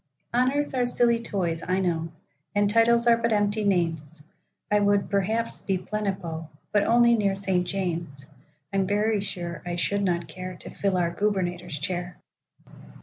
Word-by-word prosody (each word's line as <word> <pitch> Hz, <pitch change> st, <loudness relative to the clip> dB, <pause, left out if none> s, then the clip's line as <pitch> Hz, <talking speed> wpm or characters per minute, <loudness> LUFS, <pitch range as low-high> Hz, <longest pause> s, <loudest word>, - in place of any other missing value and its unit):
Honors 265 Hz, +4 st, +1 dB
are 250 Hz, -2 st, +1 dB
silly 240 Hz, -1 st, +2 dB
toys, 175 Hz, -7 st, -2 dB
I 185 Hz, +1 st, 0 dB
know, 165 Hz, -3 st, -1 dB, 0.4 s
And 205 Hz, 0 st, +3 dB
titles 230 Hz, +2 st, +4 dB
are 235 Hz, -1 st, +5 dB
but 230 Hz, 0 st, 0 dB
empty 210 Hz, 0 st, +1 dB
names;I 165 Hz, +1 st, -2 dB
would, 205 Hz, -1 st, +2 dB
perhaps, 215 Hz, +4 st, +2 dB
be 190 Hz, -1 st, -1 dB
Plenipo,—But 185 Hz, -2 st, -3 dB
only 235 Hz, +1 st, +5 dB
near 200 Hz, -4 st, +2 dB
St. 190 Hz, -2 st, 0 dB
James; 170 Hz, -7 st, -3 dB, 0.5 s
I'm 195 Hz, -1 st, +1 dB
very 210 Hz, +1 st, +1 dB
sure 175 Hz, -4 st, -5 dB
I 175 Hz, -1 st, -3 dB
should 200 Hz, +3 st, 0 dB
not 175 Hz, -3 st, 0 dB
careTo 185 Hz, +2 st, -8 dB
fill 195 Hz, -2 st, 0 dB
our 170 Hz, -1 st, 0 dB
Gubernator's 180 Hz, -5 st, -1 dB
chair. 175 Hz, +4 st, -3 dB
195 Hz, 145 wpm, -26 LUFS, 175-210 Hz, 0.5 s, are